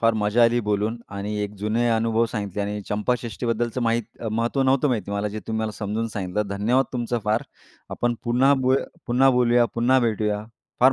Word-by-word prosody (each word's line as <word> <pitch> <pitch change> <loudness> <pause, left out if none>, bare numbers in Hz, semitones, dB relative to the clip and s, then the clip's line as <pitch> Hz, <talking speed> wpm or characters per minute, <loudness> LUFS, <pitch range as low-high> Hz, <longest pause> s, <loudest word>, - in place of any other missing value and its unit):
फार 115 0 +4
मजा 110 +3 +3
आली 120 +1 +3
बोलून 105 +3 0 0.2
आणि 105 +1 -3
एक 105 0 -4
जुने 110 +4 +1
अनुभव 115 0 +2
सांगितले 105 -2 -3
आणि 105 +1 -3
चंपाषष्ठीबद्दलचं 120 +2 -1
माहीत 115 0 -2
महत्त्व 115 +5 0
नव्हतं 135 +2 +3
माहिती 110 -5 -2
मला, 100 +1 -1
जे 105 +1 -6
तुम्ही 110 0 -2
मला 110 - -1
समजून 110 +2 -2
सांगितलं. 100 -1 -2
धन्यवाद 115 +7 +2
तुमचं 120 -1 -1
फार. 110 +2 +1 0.5
आपण 120 0 0
पुन्हा 125 +4 +4
बो 130 0 +2 0.3
पुन्हा 130 +2 +4
बोलूया, 120 -1 +4
पुन्हा 125 +3 +3
भेटूया. 105 -2 0 0.4
फार 130 +2 +7
115 Hz, 175 wpm, -24 LUFS, 105-120 Hz, 0.5 s, फार